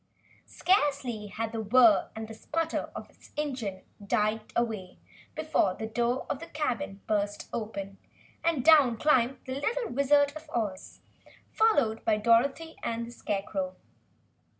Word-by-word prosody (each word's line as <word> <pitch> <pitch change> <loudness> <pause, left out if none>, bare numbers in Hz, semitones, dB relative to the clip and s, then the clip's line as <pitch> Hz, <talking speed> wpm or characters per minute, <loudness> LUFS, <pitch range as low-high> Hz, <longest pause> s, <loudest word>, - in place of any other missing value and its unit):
Scarcely 280 - +1
had 225 +2 -4
the 225 -1 -3
whirr 225 0 +5
and 220 0 -6
sputter 325 +7 -2
of - - -7
its - - -19
engine 250 -10 -3 0.2
died 215 +2 0
away 220 -6 -2 0.4
before 310 -12 +1
the 220 - -5
door 240 +3 -1
of 270 - -3
the 335 - -8
cabin 290 -9 -3
burst 205 -1 -1
open 200 -3 -5 0.4
and 325 -7 +1
down 285 -8 +6
climbed 260 -2 +3
the 260 - -4
little 470 +8 -1
Wizard 285 +2 +3
of 310 0 -10
Oz, 210 -8 -4 0.5
followed 285 - +2
by 215 -1 +2
Dorothy 260 +9 +2
and 230 0 -2
the 235 - -10
Scarecrow. 195 -4 -3
235 Hz, 135 wpm, -29 LUFS, 215-290 Hz, 0.5 s, down